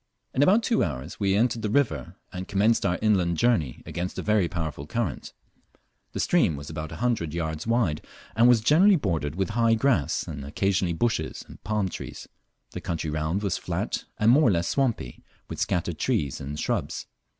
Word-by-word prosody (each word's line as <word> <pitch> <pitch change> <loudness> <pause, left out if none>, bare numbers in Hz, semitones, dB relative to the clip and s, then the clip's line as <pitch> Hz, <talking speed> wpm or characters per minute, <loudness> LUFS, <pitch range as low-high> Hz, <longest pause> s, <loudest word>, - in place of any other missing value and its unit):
In 130 - +1
about 205 +9 +5
two 230 -1 +2
hours 70 +1 -5
we 100 -2 +2
entered 115 +2 +1
the 105 - -1
river, 105 - 0 0.2
and 90 0 -5
commenced 105 +4 +2
our 90 - 0
inland 90 -6 +2
journey 95 - +1
against 90 +1 -4
a - - -3
very 105 -4 +2
powerful 80 -4 -4
current. 110 - -3 0.8
The - - -4
stream 80 - +3
was 70 +2 -8
about 80 -1 -5
a - - -6
hundred 110 -10 -1
yards 80 +1 -3
wide, 115 -10 +1 0.3
and 115 +2 +5
was 120 -3 +5
generally 180 - +5
bordered 80 - -1
with 95 +2 -1
high 115 0 +3
grass, 115 - +1
and 70 -3 -7
occasionally 90 +4 0
bushes 80 -3 -1
and - - -14
palm 105 -2 0
trees. - - -8 0.4
The - - -6
country 80 -3 -3
round 80 +6 -1
was 100 -4 -1
flat - - -3
and 110 +2 +4
more 150 +5 +5
or - - +5
less 85 -2 0
swampy, 120 - -1 0.2
with - - -7
scattered 85 -2 -1
trees 70 -2 -1
and 75 +2 -5
shrubs. - - -2
95 Hz, 185 wpm, -26 LUFS, 80-115 Hz, 0.8 s, about